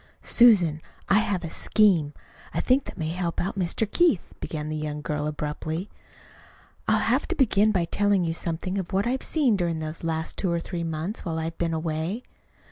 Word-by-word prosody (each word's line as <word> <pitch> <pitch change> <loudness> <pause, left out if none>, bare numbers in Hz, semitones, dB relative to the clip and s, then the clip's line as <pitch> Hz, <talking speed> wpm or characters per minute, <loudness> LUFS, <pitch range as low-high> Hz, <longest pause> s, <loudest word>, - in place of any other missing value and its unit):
"Susan, 185 -10 +5 0.3
I 200 - +6
have 200 -3 -1
a 165 - -5
scheme, 175 -9 +3 0.4
I - - +1
think, 260 +2 +2
that - - -9
may 160 -3 -2
help 170 0 -2
out 190 - -1
Mr. 190 +3 0
Keith," 225 - +2
began 150 -1 -4
the 155 - -3
young 150 -1 -4
girl 150 0 -2
abruptly. 155 +4 -4 1.0
"I'll - - +4
have - - +1
to - - -2
begin 215 -5 +3
by 180 -5 +1
telling 200 0 +2
you 165 - -1
something 170 +4 -3
of 180 - -5
what 195 +2 +1
I've 255 +2 0
seen 280 -9 +2
during 170 -4 -1
these 155 +1 -5
last 160 -1 -2
two 185 - 0
or 170 - +1
three 170 0 -4
months, 165 +6 -3
while 165 -4 -3
I've 165 +1 -4
been 165 -1 0
away. 160 +8 -2
170 Hz, 195 wpm, -26 LUFS, 160-205 Hz, 1.0 s, I